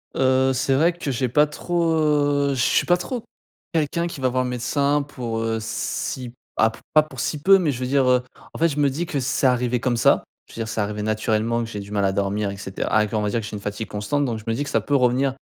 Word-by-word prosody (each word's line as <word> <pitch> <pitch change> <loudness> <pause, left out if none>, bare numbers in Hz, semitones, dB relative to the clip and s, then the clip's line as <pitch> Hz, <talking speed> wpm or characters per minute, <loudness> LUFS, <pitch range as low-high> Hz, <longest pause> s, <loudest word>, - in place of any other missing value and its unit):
Heu, 130 0 +3
c'est 130 +1 +1
vrai 165 +5 +3
que 170 -5 -5
j'ai 125 +1 0
pas 150 +4 +4
trop, 170 +2 -1
heu 145 -2 +2
je 125 - -1
suis - - +3
pas 175 0 +4
trop 240 +5 -5 0.5
quelqu'un 165 +2 0
qui 155 -6 -6
va 130 - +2
voir 130 +1 0
le 125 - -3
médecin 140 +4 +1
pour, 120 -5 -5
heu, 115 0 -1
si, 120 +2 -4 0.2
ah 110 - +4
p 110 - -12
pas 155 - +7
pour 140 -5 -10
si 145 +3 -2
peu, 195 +3 +7
mais 165 -6 +1
je 125 - -5
veux 125 - -2
dire, 135 -1 +2
heu, 125 0 +4 0.3
en - - -8
fait, 165 - +4
je 150 -2 -3
me 140 -1 +4
dis 165 +5 -3
que 145 -6 -2
c'est 130 +1 +1
arrivé 125 -1 +1
comme 120 -1 0
ça. - - +4 0.2
Je - - -16
veux - - -9
dire, 110 - -2
c'est 110 -1 -2
arrivé 105 +1 -3
naturellement 110 +2 0
que 115 - -6
j'ait 105 - -5
du 100 +1 -9
mal 100 -1 +1
à 95 - +2
dormir 100 +1 -1
et 100 - -8
cetera, 95 -1 -4
ah, 105 0 +3
qu'on 105 0 -1
va 105 - 0
dire, 115 - 0
que 105 - -6
j'ai 110 - -6
une 100 - -6
fatigue 105 +2 -4
constante, 140 +8 -1
donc 115 -3 -2
je - - -13
me 115 - +1
dis 140 +5 -1
que - - -6
ça - - +1
peut 145 - 0
revenir, 130 +1 +2
125 Hz, 285 wpm, -23 LUFS, 110-145 Hz, 0.5 s, pas